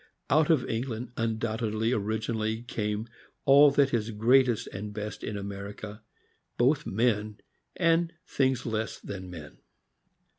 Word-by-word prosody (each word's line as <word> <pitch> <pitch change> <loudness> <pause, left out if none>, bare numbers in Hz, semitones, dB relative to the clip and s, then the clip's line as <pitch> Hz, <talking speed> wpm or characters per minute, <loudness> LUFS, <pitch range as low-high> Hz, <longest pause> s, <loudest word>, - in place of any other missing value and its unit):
Out 155 +2 +4
of 155 -6 +3
England 120 0 -3
undoubtedly 110 0 -1
origi 110 -1 -1
nally 110 0 -1
came 105 -1 -3 0.4
all 140 +2 +8
that 140 -1 +2
is 115 -1 0
greatest 120 +2 +3
and 105 +2 -5
best 105 0 -6
in 105 - -3
America, 100 +2 -7 0.6
both 135 +4 +2
men 105 -1 0 0.4
and 165 -1 +2
things 130 -6 0
less 110 -2 -2
than 95 -2 -7
men. 80 -4 -10
110 Hz, 125 wpm, -28 LUFS, 105-125 Hz, 0.6 s, all